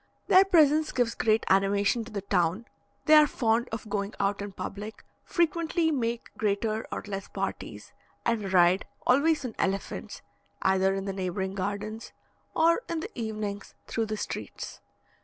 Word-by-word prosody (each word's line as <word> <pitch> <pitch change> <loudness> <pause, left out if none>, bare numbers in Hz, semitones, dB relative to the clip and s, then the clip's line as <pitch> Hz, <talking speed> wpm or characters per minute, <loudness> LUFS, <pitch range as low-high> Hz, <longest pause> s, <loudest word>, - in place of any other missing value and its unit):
Their 375 +1 +7
presence 310 -4 +4
gives 245 -2 +1
great 220 0 +1
animation 200 +4 +2
to 230 - -11
the 200 -2 -4
town; 185 +2 +1 0.4
they 310 - +5
are 305 -1 +8
fond 235 -2 +1
of 225 -1 -5
going 200 0 -3
out 200 0 0
in 205 0 -5
public, 205 +3 -7 0.2
frequently 335 -1 +1
make 235 -4 -2
greater 215 +1 0
or - - -4
less 195 -1 -5
parties, - - -5 0.3
and 215 -5 0
ride 180 +1 +4 0.2
(always 285 +3 +3
on 235 - -4
elephants) 195 +1 -3 0.4
either 190 0 +3
in 195 0 -3
the 195 - -3
neighbouring 190 0 -3
gardens, 205 +3 -4 0.4
or 335 +6 +4
in 335 -2 -2
the 410 - -6
evenings 215 -3 -5
through 225 -1 -2
the 215 0 -3
streets. - - -6
215 Hz, 155 wpm, -28 LUFS, 195-255 Hz, 0.4 s, are